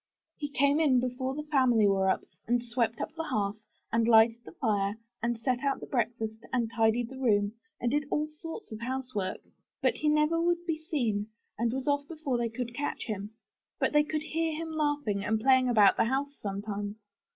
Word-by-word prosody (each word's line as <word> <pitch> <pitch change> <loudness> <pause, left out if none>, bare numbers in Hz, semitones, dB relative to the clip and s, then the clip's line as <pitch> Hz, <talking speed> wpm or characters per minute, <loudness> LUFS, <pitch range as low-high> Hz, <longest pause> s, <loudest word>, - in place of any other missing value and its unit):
"He 290 -2 -4
came 280 +2 +3
in 275 -6 +4
before 255 +2 -2
the 300 +1 -5
family 245 -7 +4
were 190 -1 +3
up, - - +1 0.2
and 240 +1 +1
swept 235 -1 0
up - - -4
the 325 0 -4
hearth, 205 -4 -1 0.4
and 230 0 +3
lighted 225 +1 +5
the - - -11
fire, 205 - 0 0.3
and 235 0 -1
set 250 +1 +1
out 275 -1 +1
the - - -7
breakfast 225 -2 -2
and 235 -3 0
tidied 225 +1 +2
the 265 - -9
room, 205 -5 +2 0.3
and 240 - 0
did 295 +1 +1
all 300 - +1
sorts 320 - -9
of 215 - -6
house 255 +2 -4
work. 190 -3 -2 0.4
But - - +1
he 300 - +1
never 300 +2 +3
would 345 0 +1
be 325 -2 -1
seen 240 - -1 0.3
and 230 +1 0
was 260 +2 -3
off 285 0 +1
before 300 -6 -2
they 235 -1 0
could 235 +1 -5
catch 285 +4 -3
him. 210 -1 -5 0.4
But - - +1
they 295 - +6
could 305 0 -2
hear 320 0 -1
him 325 +1 -4
laughing 290 -10 0
and 220 +2 +1
playing 260 +1 +4
about 210 -5 +6
the - - +4
house 275 +4 -1
sometimes." 205 +1 -4
245 Hz, 205 wpm, -30 LUFS, 220-290 Hz, 0.4 s, they